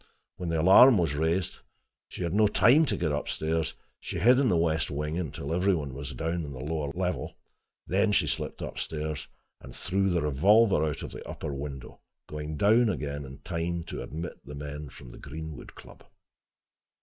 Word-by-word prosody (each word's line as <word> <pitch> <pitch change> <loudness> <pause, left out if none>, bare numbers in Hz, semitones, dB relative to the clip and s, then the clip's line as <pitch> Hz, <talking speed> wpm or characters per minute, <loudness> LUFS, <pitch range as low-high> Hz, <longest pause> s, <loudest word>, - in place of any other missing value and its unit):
When 90 -2 -4
the 80 -1 0
alarm 105 +9 +8
was 85 -6 +1
raised, 80 +4 -1 0.5
she - - -6
had 85 - -1
had 100 - 0
no 105 - +6
time 120 +10 +5
to - - 0
get 80 -3 0
up 75 0 -2
stairs: 80 0 -1 0.2
she - - -5
hid 125 +4 +5
in 135 -3 +3
the 90 - +3
west 80 -3 +1
wing 75 +2 -3
until 80 -1 -4
every 95 +2 +2
one 70 -5 -4
was 70 +1 -6
down 80 +6 -2
on 70 -2 -7
the 65 - -8
lower 75 0 -3
floor. 90 +3 -3 0.5
Then 100 +4 +2
she - - +3
slipped - - -3
upstairs, 75 -1 -4 0.3
and - - -12
threw 95 +1 0
the 85 -3 +1
revolver 95 +6 +4
out 75 -2 -2
of - - -7
an - - -7
upper 70 - -5
window, 70 -2 -7 0.3
going 75 0 -5
down 110 +6 +4
again 70 -6 -3
in 65 +1 -11
time 85 -1 -2
to - - -5
admit 80 +8 -7
the 70 +3 -9
men 75 0 -6
from 60 -1 -12
the - - -12
Greenwood 80 +2 -8
Club. - - -14
80 Hz, 195 wpm, -28 LUFS, 75-95 Hz, 0.5 s, alarm